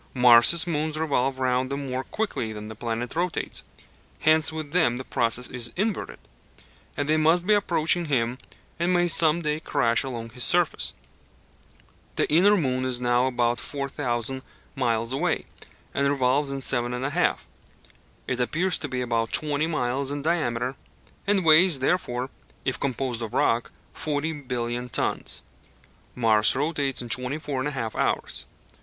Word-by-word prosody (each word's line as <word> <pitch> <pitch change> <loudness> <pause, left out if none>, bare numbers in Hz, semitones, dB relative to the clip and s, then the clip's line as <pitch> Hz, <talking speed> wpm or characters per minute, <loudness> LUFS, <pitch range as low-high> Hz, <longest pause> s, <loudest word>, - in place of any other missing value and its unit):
Mars' 125 +7 +6
moons 155 -2 -1
revolve 135 -4 0
round 130 0 0
him 140 0 -3
more 130 0 -3
quickly 205 - -3
than 105 0 -7
the 110 - -8
planet 115 +3 -4
rotates: 175 +1 -2 0.6
hence 155 0 +4
with 155 -2 -6
them 160 -8 +2
the 130 - -3
process 120 0 -1
is 120 -2 -3
inverted, 205 +2 -2 0.8
and 145 - -1
they 155 +1 +3
must 165 +3 +3
be 210 - +4
approaching 175 -3 +2
him 125 -4 0 0.4
and 170 +2 +1
may 175 0 +3
some 165 0 +3
day 150 0 -1
crash 115 -6 +1
along 115 -4 -6
his 125 +1 -2
surface. 175 +1 +2 1.2
The - - +1
inner 200 +6 +5
moon 130 -6 0
is 130 -1 +1
now 125 +1 +2
about 120 -2 0
4,000 130 -1 -3 0.3
miles 115 -2 0
away, 160 +5 0 0.5
and 140 0 +1
revolves 140 +1 +1
in 135 0 -3
7 120 -2 +1
1/2 135 +5 -3
hours. 180 - +2 0.9
It 125 - -2
appears 165 +8 +1
to - - -4
be 125 -1 -2
about 115 -2 -1
20 150 0 +2
miles 135 -3 -1
in 145 0 -3
diameter, 130 -6 0 0.5
and 200 -3 +2
weighs 160 +1 +6
therefore, 130 -3 -1 0.3
if 130 - -1
composed 130 -3 -2
of 110 -2 -5
rock, 115 +1 +1 0.2
40 155 +1 -2 0.2
billion 120 0 -2
tons. - - -1 0.7
Mars 110 -3 +4
rotates 140 -2 -1
in 120 - -9
24 130 +2 -1
1/2 130 -7 -3
hours. - - -1
135 Hz, 150 wpm, -25 LUFS, 120-155 Hz, 1.2 s, Mars